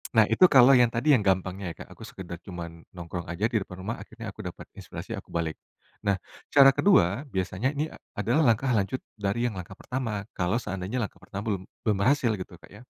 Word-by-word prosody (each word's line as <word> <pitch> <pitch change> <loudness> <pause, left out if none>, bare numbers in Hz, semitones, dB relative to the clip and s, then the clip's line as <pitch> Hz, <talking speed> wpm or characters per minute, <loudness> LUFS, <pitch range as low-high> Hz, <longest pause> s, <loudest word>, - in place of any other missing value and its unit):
Nah, 110 -2 +6
itu - - +3
kalau 135 0 +8
yang 120 -2 +5
tadi 135 +5 +4
yang 105 - +1
gampangnya 95 -1 0
ya, - - -11
Kak. - - -9
Aku - - -12
sekedar 90 -2 -8
cuman 85 -2 -7
nongkrong 85 0 -6
aja 95 +6 -1
di 115 - +2
depan 95 0 -11
rumah, 115 +4 -2
akhirnya 115 -1 -9
aku 110 - -10
dapat 90 -1 -8
inspirasi, - - -7
aku - - -10
balik. 80 -2 -2 0.5
Nah, 100 - +3 0.4
cara 135 -1 +9
kedua 115 - +4
biasanya 95 +7 -1
ini 150 +2 0 0.3
adalah 120 +10 +2
langkah 120 +4 +3
lanjut 100 +6 -1 0.2
dari 105 +3 0
yang 110 - -4
langkah 90 +1 -7
pertama, 115 -5 -4
kalau 90 +5 +1
seandainya 95 +4 -4
langkah - - -5
pertama 100 +1 -6
belum 95 -4 -1 0.2
belum 105 -4 +2
berhasil 130 +1 +3
gitu, 90 -1 -8
Kak, - - -17
ya. 110 - -13
105 Hz, 210 wpm, -27 LUFS, 95-120 Hz, 0.5 s, cara